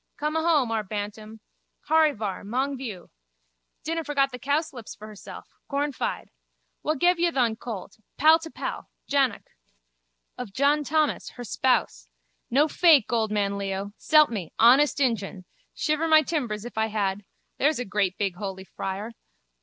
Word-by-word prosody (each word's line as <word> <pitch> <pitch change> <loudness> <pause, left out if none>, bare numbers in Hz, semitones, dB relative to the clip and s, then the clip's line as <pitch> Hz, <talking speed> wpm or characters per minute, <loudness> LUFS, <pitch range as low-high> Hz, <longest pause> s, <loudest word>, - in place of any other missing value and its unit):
Come 300 +1 -2
ahome, 320 -7 +2
our 225 -1 0
Bantam. 210 +2 -6 0.5
Horryvar, 295 -11 +2
mong 260 +7 -1
vioo. 220 -9 -7 0.7
Dinna 330 +1 -2
forget 275 -2 +1
the 250 - -7
cowslips 280 -3 -2
for 210 - -11
hersel. 210 -2 -10 0.3
Cornfide. 285 -1 -2 0.5
Wha 310 - 0
gev 350 +4 +3
ye 345 0 +3
thon 245 -8 +1
colt? 220 -4 -8 0.2
Pal 315 +2 +6
to 325 0 -8
pal. - - -6 0.2
Jannock. 275 -5 0 0.9
Of 235 -6 -6
John 285 +5 +2
Thomas, 305 +1 0
her 245 - -8
spouse. 225 - 0 0.4
No 285 +5 +4
fake, 305 - +4
old 220 -2 +1
man 200 -1 0
Leo. 195 +1 -4
S'elp 305 -4 +5
me, 195 -8 -5
honest 270 +6 +5
injun. 205 -8 -1 0.3
Shiver 305 +1 0
my 315 -1 +6
timbers 240 -9 -3
if 240 -2 -5
I 220 - +2
had. 205 -2 -2 0.4
There's 300 +3 +3
a 250 - -3
great 195 -2 -1
big 195 -4 -2
holy 190 -1 -5
friar. 195 +3 -5
245 Hz, 150 wpm, -26 LUFS, 205-295 Hz, 0.9 s, Pal